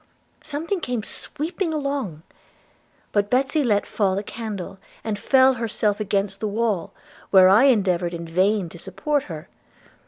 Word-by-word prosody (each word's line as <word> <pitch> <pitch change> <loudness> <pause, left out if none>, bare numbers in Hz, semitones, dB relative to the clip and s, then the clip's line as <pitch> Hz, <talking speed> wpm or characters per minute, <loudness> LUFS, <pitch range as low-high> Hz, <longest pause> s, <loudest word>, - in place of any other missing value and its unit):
Something 320 +6 -3
came 245 -8 -3
sweep 315 - -6
along; 280 - -2 0.9
but 205 -1 +1
Betsy 270 +4 +2
let 210 -5 +2
fall 195 -3 0
the 200 - -2
candle, 205 -4 -6 0.2
and 210 -2 -3
fell 265 +2 +5
herself 220 -3 -1
against 200 -1 -1
the 215 - -2
wall, 210 -4 -1 0.4
where 190 -1 +7
I 215 +7 +6
endeavoured 185 -8 +2
in 170 0 -6
vain 185 +3 +1
to 170 - -12
support 280 - -2
her. 155 -3 -8
210 Hz, 145 wpm, -23 LUFS, 190-265 Hz, 0.9 s, where